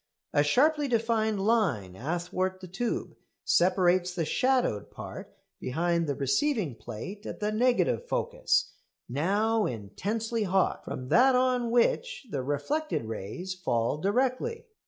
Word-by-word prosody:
A 145 - +4
sharply 290 - +3
defined 225 -3 +1
line 155 - +1
athwart 175 - -2
the 185 - -9
tube 210 +7 -3 0.3
separates 180 0 +3
the 165 -3 0
shadowed 250 - +1
part - - -9 0.3
behind 170 +4 0
the 140 - -1
receiving 180 - +1
plate 120 - -8
at - - -6
the 210 0 0
negative 250 - +2
focus - - 0 0.3
now 205 - +1
intensely 210 - -3
hot 190 -2 +1
from 130 0 -6
that 260 +2 +5
on 250 -2 +2
which 280 - +1
the 135 - -1
reflected 145 - -1
rays 110 - -5
fall 120 -7 -1
directly. 260 - 0
195 Hz, 125 wpm, -28 LUFS, 150-245 Hz, 0.3 s, that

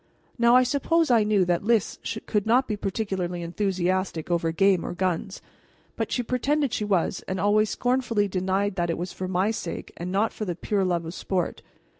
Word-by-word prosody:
Now 235 +1 +5
I 255 - +7
suppose 290 +4 +1
I 230 -3 +5
knew 210 -3 +3
that 175 0 0
Lys 225 -2 +1 0.3
could 210 -1 0
not 250 +3 +4
be 215 - -1
particularly 190 -4 -3
enthusiastic 185 -1 -1
over 170 -1 +1
game 195 +1 +3
or - - -4
guns; 185 +1 -2 0.5
but - - -3
she 245 - 0
pretended 270 +2 0
she 215 - -1
was, 190 -3 0
and 190 0 -2
always 210 +3 +3
scornfully 245 -5 +1
denied 190 +1 -1
that 175 -1 0
it 165 - -1
was 175 +1 -4
for 185 - -4
my 190 +3 +1
sake 180 -6 -5
and 175 +1 -5
not 205 +4 +1
for - - -5
the 175 -3 -3
pure 195 +3 -1
love 175 -2 0
of 165 - -6
sport. 185 -1 -2
195 Hz, 195 wpm, -25 LUFS, 180-220 Hz, 0.5 s, I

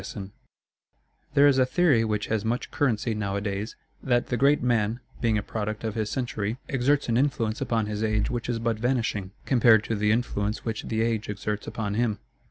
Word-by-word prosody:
[TN]] 95 -1 -7 1.0
There 140 0 +7
is 135 -2 +4
a 130 - +5
theory 135 -4 +3
which 105 -2 -1
has 110 -2 -1
much 115 +2 -2
currency 120 -5 0
nowadays, 100 0 -3 0.3
that 120 -2 +1
the 125 - 0
great 140 +3 +3
man, 115 -2 +1 0.2
being 115 -3 +2
a 105 - -2
product 110 0 -4
of 110 -2 -2
his 110 -1 -2
century, 115 -4 -2
exerts 135 +2 +1
an 115 -1 +2
influence 120 -5 0
upon 115 -2 0
his 105 0 -4
age 110 -1 +1
which 120 -1 -3
is 120 - 0
but 115 -1 -1
vanishing, 115 -5 0 0.2
compared 115 -4 +5
to 115 - -2
the 105 0 +2
influence 105 -3 -1
which 110 -2 -3
the 110 0 0
age 115 -2 -1
exerts 105 +1 -3
upon 105 -3 -3
him. 110 -1 0
115 Hz, 190 wpm, -26 LUFS, 105-120 Hz, 1.0 s, There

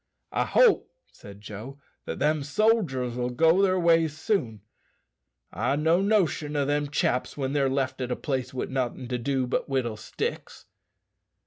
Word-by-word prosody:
"I - - 0
hope," - - +4 0.2
said 100 0 -13
Joe, 110 +6 -8 0.3
"that - - -4
them 150 +1 +1
sodgers'll 135 - +1
go 165 +6 +4
their 185 -1 +3
ways 165 -3 +3
soon. 145 - -1 0.9
I've 120 +9 0
no 160 +4 +3
notion 180 -8 +1
o' 145 -1 +1
them 145 +1 0
chaps 130 -2 -1
when 135 -1 -2
they're 140 -2 +2
left 135 -1 -1
at 125 - -2
a - - +1
place 130 -4 -3
wi' 130 - -3
nothin' 130 -1 -3
to 125 -1 -2
do 130 +1 0
but 125 - -2
whittle 125 -5 -1
sticks." - - -5
140 Hz, 155 wpm, -26 LUFS, 125-160 Hz, 0.9 s, hope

